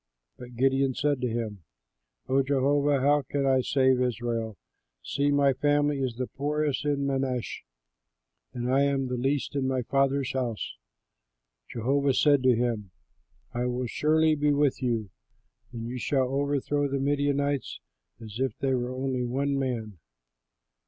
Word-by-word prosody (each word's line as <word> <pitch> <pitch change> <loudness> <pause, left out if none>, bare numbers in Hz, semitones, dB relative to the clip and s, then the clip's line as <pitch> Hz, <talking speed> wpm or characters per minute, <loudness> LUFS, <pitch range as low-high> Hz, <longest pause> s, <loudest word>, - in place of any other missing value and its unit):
But 125 0 -11
Gideon 135 +1 +2
said 145 -3 0
to 125 - +1
him, 110 -5 -4 0.6
"O 135 +1 +3
Jehovah, 140 +1 +2
how 145 +2 +4
can 140 +1 -2
I 130 -1 +3
save 130 -1 +2
Israel? 115 -3 -2 0.5
See, 140 +1 0
my 140 -1 +3
family 145 +1 +1
is 130 -3 -2
the 130 +2 -2
poorest 150 +2 -2
in 140 -1 0
Manasseh, 135 -3 -2 0.9
and 125 0 -2
I 135 - +4
am 140 -1 +1
the 125 0 -3
least 135 +3 -1
in 135 -2 0
my 130 -1 0
father's 135 +1 +1
house." 125 -5 -3 0.9
Jehovah 135 +3 +1
said 145 -3 +4
to 130 -1 +4
him, 115 -4 -1 0.6
"I 120 +1 -1
will 125 +1 -2
surely 155 +6 +2
be 150 0 +2
with 145 -2 +1
you, 115 -6 -1 0.6
and 115 -1 -6
you 125 +2 -5
shall 130 0 +1
overthrow 145 +1 0
the 140 0 -2
Midianites 140 0 0 0.4
as 110 0 -9
if 130 0 -1
they 135 -1 0
were 125 -1 -1
only 130 -1 -1
one 140 +3 -1
man." 115 -8 -3
135 Hz, 150 wpm, -27 LUFS, 125-140 Hz, 0.9 s, how